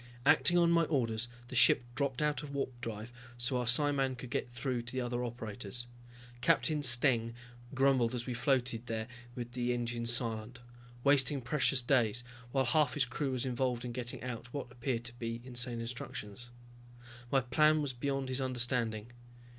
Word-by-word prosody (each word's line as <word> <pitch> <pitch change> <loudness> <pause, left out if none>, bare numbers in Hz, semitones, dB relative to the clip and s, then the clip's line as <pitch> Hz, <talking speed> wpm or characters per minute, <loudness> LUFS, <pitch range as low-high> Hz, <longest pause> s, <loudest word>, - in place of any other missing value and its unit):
Acting 145 +5 +5
on 170 -1 +4
my 170 -1 +4
orders 120 -6 -1 0.2
the - - -6
ship 120 - +6
dropped 135 0 -1
out 150 0 0
of 150 - -8
warpdrive 120 -5 -4 0.3
so 120 +2 -1
our 125 -1 -2
psiman 135 +1 +3
could 125 -1 -9
get - - -2
through 120 0 -2
to 120 0 -7
the 130 - -1
other 120 0 -2
operators. 120 -1 -4 0.6
Captain 150 +4 +2
Steng 120 -3 +5 0.4
grumbled 130 -3 +3
as 120 -1 -4
we 125 - -3
floated 125 -2 0
there 110 -1 -3 0.3
with 120 -1 -5
the 125 0 -1
engines 120 -1 0
silent, 115 0 0 0.4
wasting 140 0 +4
precious 130 0 +1
days, 120 -3 +2 0.3
while 135 0 +2
half 145 0 +2
his 145 -3 +2
crew 135 +3 -2
was 130 0 -1
involved 125 -1 -1
in 120 - -4
getting 120 0 -5
out 120 -1 -6
what 135 -3 -5
appeared 120 -1 -2
to 120 - -5
be 115 -1 -3
insane 120 -1 -2
instructions. 115 -1 -7 0.8
My 135 - +4
plan 155 +5 +3
was 135 -3 -3
beyond 135 +1 -2
his 130 +1 -1
understanding. 120 -3 -1
125 Hz, 170 wpm, -33 LUFS, 120-135 Hz, 0.8 s, ship